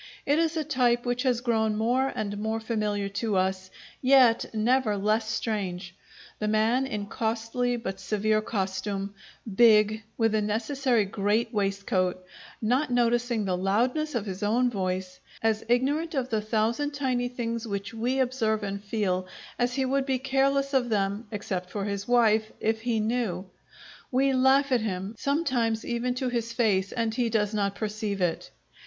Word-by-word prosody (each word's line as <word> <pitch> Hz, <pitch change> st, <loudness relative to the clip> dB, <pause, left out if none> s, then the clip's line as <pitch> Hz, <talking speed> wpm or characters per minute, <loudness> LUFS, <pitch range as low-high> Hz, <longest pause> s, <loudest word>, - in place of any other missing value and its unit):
It 290 Hz, +3 st, +3 dB
is 330 Hz, 0 st, +1 dB
a 315 Hz, -, 0 dB
type 250 Hz, -4 st, +1 dB
which 245 Hz, 0 st, 0 dB
has 250 Hz, -3 st, +1 dB
grown 220 Hz, -3 st, +1 dB
more 250 Hz, +5 st, +1 dB
and 205 Hz, -1 st, -3 dB
more 220 Hz, +1 st, -1 dB
familiar 210 Hz, -3 st, -1 dB
to 205 Hz, +1 st, -2 dB
us, 185 Hz, 0 st, 0 dB, 0.3 s
yet 255 Hz, -3 st, +5 dB
never 225 Hz, 0 st, +1 dB
less 215 Hz, +2 st, +1 dB
strange: 190 Hz, -6 st, -3 dB, 0.5 s
the 215 Hz, -, -1 dB
man 225 Hz, +5 st, +2 dB
in 210 Hz, -5 st, -3 dB
costly 230 Hz, +3 st, -1 dB
but 195 Hz, -4 st, -5 dB
severe 215 Hz, +2 st, +1 dB
costume, 195 Hz, -1 st, -3 dB, 0.4 s
big, 215 Hz, -1 st, +5 dB, 0.2 s
with 225 Hz, -2 st, +2 dB
a 215 Hz, -, +2 dB
necessary 230 Hz, +2 st, +1 dB
great 205 Hz, +5 st, 0 dB
waistcoat, 195 Hz, -3 st, -1 dB, 0.4 s
not 255 Hz, +7 st, +2 dB
noticing 240 Hz, -2 st, +1 dB
the 185 Hz, -2 st, 0 dB
loudness 245 Hz, +11 st, 0 dB
of 220 Hz, -3 st, -1 dB
his 190 Hz, -1 st, -6 dB
own 240 Hz, +4 st, +2 dB
voice; 185 Hz, -2 st, -3 dB, 0.2 s
as 220 Hz, -1 st, +1 dB
ignorant 290 Hz, +7 st, +1 dB
of 260 Hz, -2 st, -1 dB
the 220 Hz, -3 st, 0 dB
thousand 230 Hz, +7 st, 0 dB
tiny 255 Hz, -3 st, 0 dB
things 235 Hz, -2 st, -4 dB
which 200 Hz, +1 st, -4 dB
we 240 Hz, +4 st, -1 dB
observe 225 Hz, -4 st, 0 dB
and 200 Hz, 0 st, -4 dB
feel 195 Hz, -4 st, -1 dB, 0.3 s
as 245 Hz, 0 st, +1 dB
he 270 Hz, -1 st, +1 dB
would 270 Hz, +1 st, 0 dB
be 265 Hz, -1 st, +1 dB
careless 275 Hz, +1 st, +1 dB
of 250 Hz, -3 st, +2 dB
them 205 Hz, +1 st, -1 dB
(except 190 Hz, -4 st, -4 dB
for 200 Hz, +1 st, -3 dB
his 200 Hz, -1 st, -3 dB
wife) 220 Hz, -3 st, +3 dB
if 220 Hz, 0 st, 0 dB
he 230 Hz, -1 st, 0 dB
knew. 215 Hz, -5 st, -1 dB, 0.7 s
We 270 Hz, +1 st, +2 dB
laugh 265 Hz, +2 st, +4 dB
at 250 Hz, -3 st, +3 dB
him, 195 Hz, -1 st, -3 dB
sometimes 255 Hz, -7 st, 0 dB
even 245 Hz, +1 st, -1 dB
to 255 Hz, 0 st, -1 dB
his 230 Hz, -1 st, -2 dB
face, 200 Hz, -5 st, +1 dB
and 230 Hz, -2 st, -1 dB
he 240 Hz, -1 st, 0 dB
does 210 Hz, -1 st, 0 dB
not 200 Hz, -2 st, 0 dB
perceive 210 Hz, -1 st, -3 dB
it. 175 Hz, -3 st, -1 dB
225 Hz, 165 wpm, -27 LUFS, 205-250 Hz, 0.7 s, yet